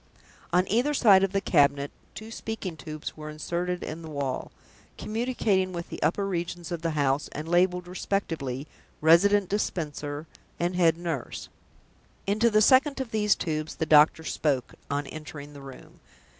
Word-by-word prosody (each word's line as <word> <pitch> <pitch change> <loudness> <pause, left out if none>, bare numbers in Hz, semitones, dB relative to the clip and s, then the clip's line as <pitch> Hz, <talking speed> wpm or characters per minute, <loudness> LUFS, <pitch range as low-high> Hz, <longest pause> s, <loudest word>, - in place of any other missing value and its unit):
On 180 +2 +3
either 250 +8 +1
side 200 -7 +6
of 195 - +1
the 195 - +1
cabinet 140 -5 +3 0.2
two 220 +1 -8
speaking 220 -6 -5
tubes 155 +1 -7
were 155 0 -8
inserted 175 +4 -3
in 155 +2 -6
the 160 - -8
wall, 140 -3 -3 0.5
communicating 215 -5 0
with 170 -1 -5
the - - -7
upper 195 +4 +1
regions 175 -1 -4
of 170 -2 -3
the 165 - 0
house, 140 0 +1
and 155 +2 -5
labeled 180 +1 +2
respectively 165 -8 -3 0.3
"Resident 190 +5 +5
Dispenser" 150 -6 -3 0.3
and 175 +1 0
"Head 165 -2 +4
Nurse." 165 -7 -4 0.8
Into 215 +4 +3
the 215 -1 +4
second 275 +4 +5
of 260 -4 -4
these 210 -2 +3
tubes 155 -2 -3
the 160 - -1
doctor 155 +1 +5
spoke, 140 -5 -1 0.2
on 145 0 -1
entering 145 0 -9
the 140 - -11
room. 135 -1 -12
170 Hz, 155 wpm, -27 LUFS, 150-195 Hz, 0.8 s, side